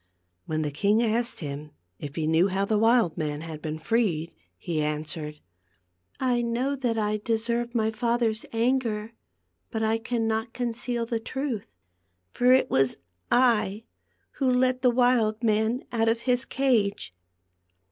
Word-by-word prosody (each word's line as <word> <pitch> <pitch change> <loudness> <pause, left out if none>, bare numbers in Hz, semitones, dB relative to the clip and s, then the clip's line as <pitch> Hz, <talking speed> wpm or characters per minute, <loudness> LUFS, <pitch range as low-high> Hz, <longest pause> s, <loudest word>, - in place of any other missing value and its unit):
When 155 0 -1
the 150 - -2
king 205 +9 +2
asked 235 0 -1
him 145 0 -6 0.3
if 145 0 -7
he 160 - -1
knew 160 +4 +4
how 195 +1 0
the 210 +1 +1
wild 225 -7 +3
man 150 -1 -2
had 160 -2 -7
been 155 0 -4
freed, 170 -3 0 0.2
he 155 - -2
an 150 0 -1
swered: 150 -1 -6 0.5
" 90 0 -49 0.2
I 250 -2 +1
know 240 +4 0
that 245 -4 -1
I 210 -1 0
deserve 235 +2 -1
my 220 -1 +2
father's 230 -1 0
anger, 230 -2 0 0.6
but 220 -2 -2
I 220 +1 +1
cannot 225 -1 -1
conceal 240 0 -2
the 230 0 -2
truth; 260 -2 -4 0.6
for 250 +1 +3
it 260 +1 +5
was 135 -1 +2 0.3
I 220 -4 +3 0.5
who 265 -2 +2
let 255 0 +2
the 255 - +5
wild 240 -3 +2
man 220 +3 +1
out 225 -2 +2
of 230 +1 0
his 250 0 +1
cage." 220 - 0
225 Hz, 155 wpm, -26 LUFS, 185-240 Hz, 0.6 s, it